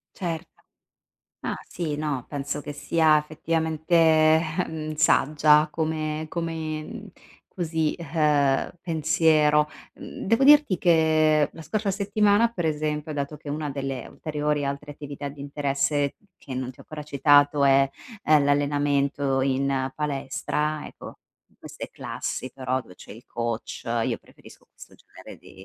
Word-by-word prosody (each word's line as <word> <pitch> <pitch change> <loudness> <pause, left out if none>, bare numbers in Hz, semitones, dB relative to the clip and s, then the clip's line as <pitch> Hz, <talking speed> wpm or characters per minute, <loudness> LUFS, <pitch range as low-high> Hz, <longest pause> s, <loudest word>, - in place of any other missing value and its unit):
Certo. 170 -2 -4 0.9
Ah - - -3
sì 165 -4 -3
no, 145 -4 -3
penso 145 0 -4
che 145 0 -7
sia 155 +1 +3
effettivamente, 160 +1 -2
ehm, 160 0 +3
saggia, 150 0 +4
come 155 -1 -2
come 165 +5 -5 0.3
così, 160 -3 -1
ehm, 150 -4 +1
pensiero. 155 -2 +3 0.3
Mhmm, - - -8
devo 230 +6 +3
dirti 290 - +6
che 155 -3 +3
la 165 - -10
scorsa 210 +4 -1
settimana, 205 +2 +3
per 175 -7 -2
esempio, 150 0 -2
dato 145 +1 -4
che 150 - -11
una 150 0 -3
delle 135 -3 -4
ulteriori 150 -1 -2
altre 140 +1 -4
attività 145 -1 -7
di 140 0 -11
interesse, 140 0 -1 0.2
che 135 - -9
non 130 0 -3
ti - - -19
ho - - -10
ancora 150 -1 -8
citato, 145 0 +4
è, 135 0 +5 0.4
ehm, 150 -2 +5
l'allenamento 140 -1 +1
in 135 0 0
palestra, 150 +1 -2
ecco - - -11 0.3
in - - -31
queste - - -8
classi 130 - -5
però 130 -1 -2
dove 100 -6 -16
c'è - - -14
il 115 +4 -11
coach 115 -1 -4 0.2
io - - -1
preferisco - - -18
questo - - -15
genere - - -14
di 95 0 -15
150 Hz, 135 wpm, -25 LUFS, 140-160 Hz, 0.9 s, dirti